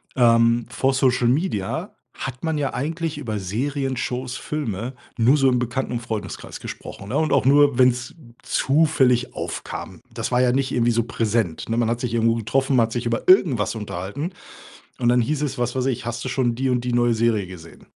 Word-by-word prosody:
Ähm, 115 Hz, -1 st, +4 dB
vor 135 Hz, 0 st, +1 dB
Social 130 Hz, -2 st, +2 dB
Media 125 Hz, -, -1 dB, 0.2 s
hat 130 Hz, -1 st, -6 dB
man 160 Hz, -2 st, 0 dB
ja 140 Hz, -2 st, -1 dB
eigentlich 160 Hz, +4 st, -3 dB
über 110 Hz, -8 st, -3 dB
Serien, 135 Hz, +8 st, -2 dB
Shows, 125 Hz, 0 st, -3 dB
Filme 120 Hz, -5 st, -4 dB, 0.2 s
nur 125 Hz, +5 st, +4 dB
so 135 Hz, -2 st, +4 dB
im 125 Hz, -1 st, +2 dB
Bekannten 125 Hz, +1 st, -2 dB
und 120 Hz, -, -1 dB
Freundeskreis 110 Hz, -4 st, -6 dB
gesprochen, 100 Hz, -, -8 dB
ne, -, -, -1 dB
und 155 Hz, -, +1 dB
auch -, -, +3 dB
nur, 140 Hz, -1 st, +5 dB
wenn's 125 Hz, -1 st, +2 dB, 0.3 s
zufällig 135 Hz, -4 st, +2 dB
aufkam. -, -, -6 dB
Das -, -, -3 dB
war 125 Hz, 0 st, +3 dB
ja 125 Hz, -1 st, +3 dB
nicht 135 Hz, +1 st, 0 dB
irgendwie 120 Hz, -1 st, +2 dB
so 115 Hz, 0 st, +1 dB
präsent, 110 Hz, -7 st, -1 dB
ne? 115 Hz, -, 0 dB
Man 120 Hz, -1 st, +2 dB
hat 120 Hz, 0 st, -1 dB
sich 120 Hz, -3 st, -2 dB
irgendwo 115 Hz, 0 st, +2 dB
getroffen, 130 Hz, +5 st, 0 dB
man 115 Hz, -2 st, +5 dB
hat 115 Hz, -, -9 dB
sich 120 Hz, 0 st, -3 dB
über 115 Hz, -1 st, -2 dB
irgendwas 140 Hz, -, +4 dB
unterhalten 105 Hz, -, -5 dB, 0.7 s
und 120 Hz, -, +1 dB
dann 125 Hz, 0 st, +4 dB
hieß 150 Hz, +5 st, -1 dB
es, 140 Hz, -4 st, -2 dB
was 120 Hz, +1 st, -1 dB
weiß 130 Hz, 0 st, 0 dB
ich: 130 Hz, -5 st, -1 dB
„Hast 120 Hz, 0 st, -4 dB
du -, -, -3 dB
schon 125 Hz, -2 st, 0 dB
die 135 Hz, +2 st, 0 dB
und 125 Hz, -1 st, +1 dB
die 125 Hz, -, -1 dB
neue 120 Hz, -1 st, +3 dB
Serie 110 Hz, -3 st, +1 dB
gesehen?“ 85 Hz, -3 st, -12 dB
125 Hz, 205 wpm, -22 LUFS, 115-135 Hz, 0.7 s, nur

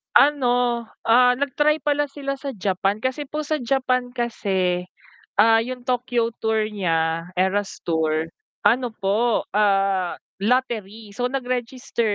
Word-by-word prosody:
ano, 245 Hz, -4 st, +3 dB, 0.2 s
ah, 250 Hz, +2 st, +6 dB
nag-try 295 Hz, +2 st, +2 dB
pala 290 Hz, -1 st, +1 dB
sila 275 Hz, -1 st, -4 dB
sa 275 Hz, 0 st, -5 dB
Japan, 195 Hz, -1 st, -1 dB
kasi 260 Hz, +4 st, -2 dB
po 300 Hz, +1 st, -5 dB
sa 310 Hz, -, +1 dB
Japan 255 Hz, -1 st, 0 dB
kasi, 190 Hz, -7 st, -1 dB, 0.5 s
ah, 225 Hz, +2 st, +6 dB
yung 250 Hz, +2 st, -3 dB
Tokyo 245 Hz, -2 st, 0 dB
tour 220 Hz, -1 st, +1 dB
nya, 165 Hz, -4 st, 0 dB
Eras 190 Hz, +2 st, -1 dB
Tour, 160 Hz, -1 st, 0 dB, 0.3 s
ano 240 Hz, 0 st, +2 dB
po, 215 Hz, +4 st, +1 dB
ah, 195 Hz, -3 st, +2 dB, 0.2 s
lottery 220 Hz, -2 st, -1 dB
so 245 Hz, +5 st, -2 dB
nag-register, 250 Hz, -3 st, -2 dB
235 Hz, 125 wpm, -23 LUFS, 195-255 Hz, 0.5 s, ah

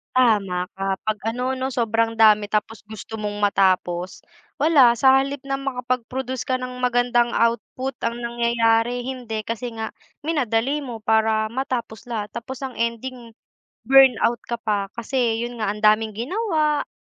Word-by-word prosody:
Tama 200 Hz, -7 st, +2 dB
ka, 195 Hz, 0 st, -2 dB
'pag, 215 Hz, -1 st, +1 dB
ano 250 Hz, +2 st, -2 dB
no, 260 Hz, +1 st, -3 dB
sobrang 230 Hz, -1 st, 0 dB
dami 210 Hz, -2 st, +5 dB
tapos 215 Hz, +1 st, -2 dB
gusto 220 Hz, +1 st, -9 dB
mong 210 Hz, -1 st, -4 dB
matapos, 185 Hz, -3 st, +1 dB, 0.4 s
wala, 285 Hz, -6 st, +6 dB
sa 265 Hz, +3 st, +5 dB
halip 275 Hz, +1 st, 0 dB
na 275 Hz, -, 0 dB
makapag-produce 255 Hz, -1 st, -3 dB
ka 255 Hz, 0 st, -1 dB
ng 250 Hz, 0 st, -6 dB
magandang 245 Hz, -1 st, +2 dB
output, 235 Hz, +3 st, -1 dB
ang 235 Hz, +1 st, -1 dB
nangyayari 235 Hz, 0 st, +1 dB
hindi, 245 Hz, -4 st, -4 dB
kasi 230 Hz, +2 st, -4 dB
nga 220 Hz, -1 st, -4 dB, 0.3 s
minadali 285 Hz, -2 st, 0 dB
mo 235 Hz, -4 st, -6 dB
para 220 Hz, 0 st, +2 dB
matapos 235 Hz, -3 st, -4 dB
lahat, 210 Hz, -2 st, -2 dB
tapos 235 Hz, +2 st, -6 dB
ang 265 Hz, -2 st, -6 dB
ending 235 Hz, +1 st, -4 dB, 0.5 s
burnout 250 Hz, -2 st, +5 dB
ka 235 Hz, -, -1 dB
pa, 210 Hz, -3 st, -2 dB
kasi 235 Hz, -1 st, -1 dB
yun 240 Hz, -1 st, -6 dB
nga, 215 Hz, -, -1 dB
ang 210 Hz, -, -11 dB
daming 215 Hz, 0 st, +3 dB
ginawa 305 Hz, -, 0 dB
235 Hz, 150 wpm, -22 LUFS, 220-255 Hz, 0.5 s, wala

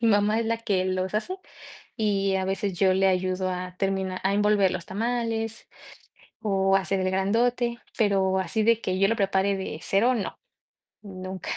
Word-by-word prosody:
mi 230 Hz, -, +3 dB
mamá 210 Hz, +1 st, +3 dB
es 230 Hz, -, -1 dB
la 230 Hz, 0 st, 0 dB
que 200 Hz, -5 st, 0 dB
los 185 Hz, +1 st, -2 dB
hace 370 Hz, -, -2 dB, 0.6 s
y, 195 Hz, -3 st, +1 dB
a 190 Hz, 0 st, 0 dB
veces, 195 Hz, -1 st, -2 dB
yo 190 Hz, 0 st, +4 dB
le 195 Hz, +1 st, +3 dB
ayudo 185 Hz, 0 st, 0 dB
a 180 Hz, 0 st, -5 dB
termina 190 Hz, -1 st, -1 dB
a 195 Hz, +1 st, +2 dB
envolver 205 Hz, -2 st, +3 dB
los 180 Hz, -1 st, -4 dB
tamales 225 Hz, +1 st, -2 dB, 0.7 s
o, 195 Hz, -2 st, +2 dB
hacer 195 Hz, 0 st, -1 dB
el 185 Hz, 0 st, 0 dB
grandote, 235 Hz, +5 st, +1 dB, 0.2 s
pero 195 Hz, -3 st, +2 dB
así 190 Hz, +4 st, -1 dB
de 230 Hz, +1 st, +3 dB
que 185 Hz, -3 st, -2 dB
yo 195 Hz, -, +4 dB
lo 230 Hz, -, +1 dB
prepare 195 Hz, -1 st, +1 dB
de 190 Hz, -5 st, -5 dB
0 230 Hz, +6 st, +2 dB
no, 215 Hz, -, -4 dB, 0.6 s
nunca. 185 Hz, -2 st, -7 dB
195 Hz, 175 wpm, -26 LUFS, 190-220 Hz, 0.7 s, yo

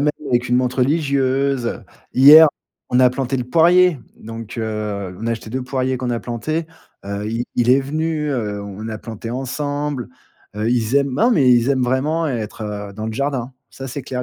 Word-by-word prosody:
même 150 Hz, +1 st, +3 dB, 0.2 s
avec 120 Hz, -1 st, +1 dB
une 125 Hz, -, +3 dB
mante 125 Hz, 0 st, 0 dB
religieuse. 135 Hz, -3 st, 0 dB, 0.3 s
Hier, 150 Hz, +4 st, +9 dB, 0.4 s
on 125 Hz, -, +3 dB
a 125 Hz, -1 st, +6 dB
planté 135 Hz, 0 st, -2 dB
le 125 Hz, -, -2 dB
poirier. 170 Hz, +3 st, +4 dB, 0.2 s
Donc, 115 Hz, +1 st, -9 dB
heu, 105 Hz, -4 st, -4 dB
on 115 Hz, -, -4 dB
a 115 Hz, -, 0 dB
acheté 115 Hz, -1 st, -5 dB
2 130 Hz, +2 st, -3 dB
poiriers 130 Hz, 0 st, -1 dB
qu'on 125 Hz, -1 st, -3 dB
a 115 Hz, -, -2 dB
planté. 155 Hz, +8 st, -3 dB, 0.4 s
Heu, 100 Hz, +1 st, -4 dB
i 115 Hz, +1 st, -2 dB
il 120 Hz, 0 st, +2 dB
est 135 Hz, +2 st, +5 dB
venu, 155 Hz, +1 st, -2 dB
heu, 105 Hz, -6 st, -3 dB
on 100 Hz, 0 st, -8 dB
l'a 110 Hz, -1 st, -5 dB
planté 115 Hz, 0 st, -7 dB
ensemble. 145 Hz, +1 st, -3 dB, 0.5 s
Heu, 110 Hz, +2 st, -1 dB
ils 120 Hz, 0 st, 0 dB
aiment 140 Hz, -2 st, +1 dB
non 230 Hz, -, +3 dB
mais 135 Hz, -, +4 dB
ils 120 Hz, +1 st, +3 dB
aiment 135 Hz, -2 st, +2 dB
vraiment 145 Hz, +6 st, 0 dB
être, 115 Hz, -5 st, -4 dB
heu, 105 Hz, -1 st, -5 dB
dans 110 Hz, +2 st, -5 dB
le 110 Hz, -, -3 dB
jardin, 135 Hz, -1 st, -2 dB, 0.2 s
ça 135 Hz, -, -8 dB
c'est 135 Hz, +3 st, -5 dB
clair, 125 Hz, -1 st, -4 dB
125 Hz, 200 wpm, -20 LUFS, 115-140 Hz, 0.5 s, Hier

